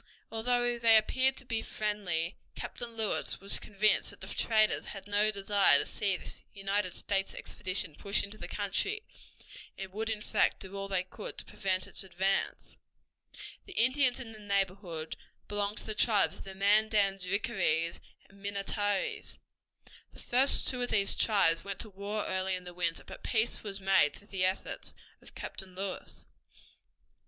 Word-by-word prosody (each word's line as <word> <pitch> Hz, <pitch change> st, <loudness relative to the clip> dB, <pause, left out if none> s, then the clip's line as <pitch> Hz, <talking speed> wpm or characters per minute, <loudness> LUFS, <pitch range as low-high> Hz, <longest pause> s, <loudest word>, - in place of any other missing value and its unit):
Although 240 Hz, +1 st, +1 dB
they 225 Hz, -1 st, +7 dB
appeared 260 Hz, +4 st, +2 dB
to 265 Hz, -, -12 dB
be 230 Hz, -2 st, -1 dB
friendly, 195 Hz, -7 st, -2 dB, 0.2 s
Captain 235 Hz, -1 st, -6 dB
Lewis 220 Hz, -2 st, 0 dB
was 200 Hz, +1 st, +2 dB
convinced 210 Hz, +1 st, +2 dB
that -, -, -12 dB
the -, -, -6 dB
traders 215 Hz, -2 st, +2 dB
had 195 Hz, -2 st, -6 dB
no 205 Hz, +1 st, +3 dB
desire 200 Hz, -1 st, +5 dB
to -, -, 0 dB
see 195 Hz, -3 st, 0 dB
this -, -, -9 dB
United 195 Hz, -1 st, -1 dB
States 195 Hz, -1 st, -1 dB
expedition 185 Hz, -4 st, -3 dB
push 200 Hz, +6 st, 0 dB
into 205 Hz, +2 st, -8 dB
the -, -, -6 dB
country, 315 Hz, -, -1 dB, 0.7 s
and 190 Hz, -1 st, -7 dB
would 220 Hz, +2 st, -2 dB
in 215 Hz, -1 st, -2 dB
fact -, -, +2 dB
do 190 Hz, +1 st, -8 dB
all 195 Hz, 0 st, -2 dB
they 190 Hz, -2 st, 0 dB
could 185 Hz, +3 st, -8 dB
to -, -, -4 dB
prevent 185 Hz, -2 st, -1 dB
its -, -, -2 dB
advance. 190 Hz, +1 st, -1 dB, 0.9 s
The 385 Hz, -, -8 dB
Indians 255 Hz, 0 st, +3 dB
in 240 Hz, -4 st, -7 dB
the 215 Hz, -, -11 dB
neighborhood 195 Hz, -5 st, -2 dB, 0.3 s
belonged 205 Hz, 0 st, -2 dB
to -, -, -5 dB
the 215 Hz, -, -2 dB
tribes 210 Hz, -1 st, +3 dB
of -, -, -9 dB
the 190 Hz, -1 st, -8 dB
Mandans, 200 Hz, -1 st, +3 dB
Rickarees, 180 Hz, -5 st, 0 dB, 0.3 s
and 195 Hz, 0 st, -19 dB
Minnetarees. 200 Hz, 0 st, -2 dB, 0.8 s
The -, -, -13 dB
first 260 Hz, +3 st, +5 dB
two 250 Hz, -1 st, +2 dB
of 245 Hz, -, -1 dB
these 200 Hz, -2 st, +4 dB
tribes 165 Hz, -7 st, +3 dB
went 200 Hz, -1 st, -5 dB
to 215 Hz, -, -5 dB
war 200 Hz, +2 st, -3 dB
early 190 Hz, 0 st, 0 dB
in 180 Hz, -, -7 dB
the 180 Hz, 0 st, -9 dB
winter, 170 Hz, -2 st, -1 dB
but -, -, -10 dB
peace 225 Hz, 0 st, 0 dB
was 200 Hz, -2 st, -5 dB
made 190 Hz, -6 st, +4 dB
through 205 Hz, -, -15 dB
the 185 Hz, -2 st, +1 dB
efforts 185 Hz, +1 st, -2 dB, 0.3 s
of -, -, -15 dB
Captain 185 Hz, -1 st, -6 dB
Lewis. 195 Hz, 0 st, -5 dB
200 Hz, 165 wpm, -31 LUFS, 190-215 Hz, 0.9 s, they